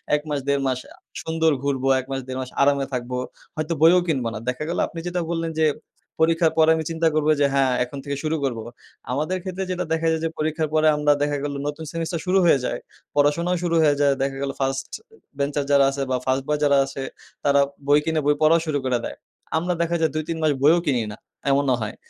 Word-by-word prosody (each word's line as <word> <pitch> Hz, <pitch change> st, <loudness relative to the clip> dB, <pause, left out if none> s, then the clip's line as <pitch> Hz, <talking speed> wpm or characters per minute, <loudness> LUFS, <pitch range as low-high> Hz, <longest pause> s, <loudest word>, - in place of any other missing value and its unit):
১ 150 Hz, -, -1 dB
মাস, 145 Hz, -1 st, 0 dB
১.৫ 140 Hz, -1 st, +2 dB
মাস 130 Hz, -1 st, 0 dB
আ -, -, -18 dB, 0.3 s
সুন্দর 160 Hz, 0 st, +1 dB
ঘুরবো। 135 Hz, -1 st, -1 dB
১ 130 Hz, -, -6 dB
মাস, 135 Hz, 0 st, -2 dB
১.৫ 130 Hz, 0 st, -4 dB
মাস 130 Hz, -, -6 dB
আরামে 140 Hz, -1 st, +3 dB
থাকবো। 125 Hz, 0 st, -3 dB, 0.4 s
হয়তো 155 Hz, +2 st, -2 dB
বইও 170 Hz, +3 st, +7 dB
কিনব 135 Hz, -7 st, 0 dB
না। 110 Hz, -, -5 dB
দেখা 125 Hz, +4 st, -3 dB
গেলো 170 Hz, -, 0 dB
আপনি 165 Hz, -, -8 dB
যেটা 175 Hz, 0 st, -1 dB
বললেন 165 Hz, -1 st, -2 dB
যে, 155 Hz, -, +4 dB, 0.6 s
পরীক্ষার 165 Hz, 0 st, +3 dB
পরে 160 Hz, 0 st, +5 dB
আমি 160 Hz, -, -2 dB
চিন্তা 165 Hz, 0 st, +1 dB
করবো 155 Hz, 0 st, +3 dB
যে, 140 Hz, -, +5 dB
হ্যাঁ, 135 Hz, -2 st, +3 dB
এখন 125 Hz, +3 st, -8 dB
থেকে 140 Hz, -1 st, -3 dB
শুরু 155 Hz, +1 st, 0 dB
করবো। 115 Hz, -5 st, -2 dB, 0.5 s
আমাদের 155 Hz, +8 st, -1 dB
ক্ষেত্রে 190 Hz, 0 st, -4 dB
যেটা 180 Hz, -1 st, -2 dB
দেখা 165 Hz, 0 st, 0 dB
যায় 160 Hz, 0 st, -1 dB
যে, 165 Hz, -, 0 dB
পরীক্ষার 155 Hz, 0 st, -1 dB
পরে 155 Hz, 0 st, +4 dB
আমরা 150 Hz, 0 st, +3 dB
দেখা 145 Hz, 0 st, +1 dB
গেলো 140 Hz, -1 st, -3 dB
নতুন 150 Hz, +2 st, -4 dB
সেমিস্টার 165 Hz, 0 st, -3 dB
শুরু 185 Hz, +1 st, +3 dB
হয়ে 145 Hz, -5 st, +5 dB
যায়, -, -, -2 dB, 0.4 s
পড়াশোনাও 165 Hz, +5 st, +2 dB
শুরু 170 Hz, -1 st, +1 dB
হয়ে 145 Hz, -1 st, +4 dB
যায়। 140 Hz, -1 st, +4 dB
দেখা 135 Hz, 0 st, -2 dB
গেলো 140 Hz, 0 st, -2 dB
first 135 Hz, 0 st, -1 dB
এ 445 Hz, -1 st, -24 dB, 0.2 s
bencher 145 Hz, 0 st, 0 dB
যারা 140 Hz, -1 st, +6 dB
আছে 140 Hz, 0 st, -4 dB
বা, 130 Hz, -, +2 dB
ফার্স্ট 130 Hz, +1 st, +1 dB
বয় 150 Hz, 0 st, 0 dB
যারা 140 Hz, -1 st, +4 dB
আছে, 135 Hz, 0 st, -7 dB, 0.4 s
তারা 140 Hz, -1 st, +4 dB, 0.3 s
বই 145 Hz, +1 st, +6 dB
কিনে 160 Hz, -1 st, +1 dB
বই 145 Hz, 0 st, +4 dB
পড়াও 160 Hz, +2 st, +5 dB
শুরু 145 Hz, -2 st, 0 dB
করে 125 Hz, -1 st, +2 dB
দেয়। -, -, -6 dB, 0.4 s
আমরা 180 Hz, +2 st, 0 dB
দেখা 170 Hz, 0 st, 0 dB
যায় 160 Hz, -, +2 dB
২ 155 Hz, -, 0 dB
৩ 165 Hz, -, -2 dB
মাস 155 Hz, -, +4 dB
বইও 165 Hz, +4 st, +6 dB
কিনি 125 Hz, -4 st, +2 dB
না 105 Hz, -, -9 dB, 0.3 s
এমনও 135 Hz, -2 st, +3 dB
হয়। 105 Hz, -, -4 dB
150 Hz, 230 wpm, -23 LUFS, 140-160 Hz, 0.6 s, বইও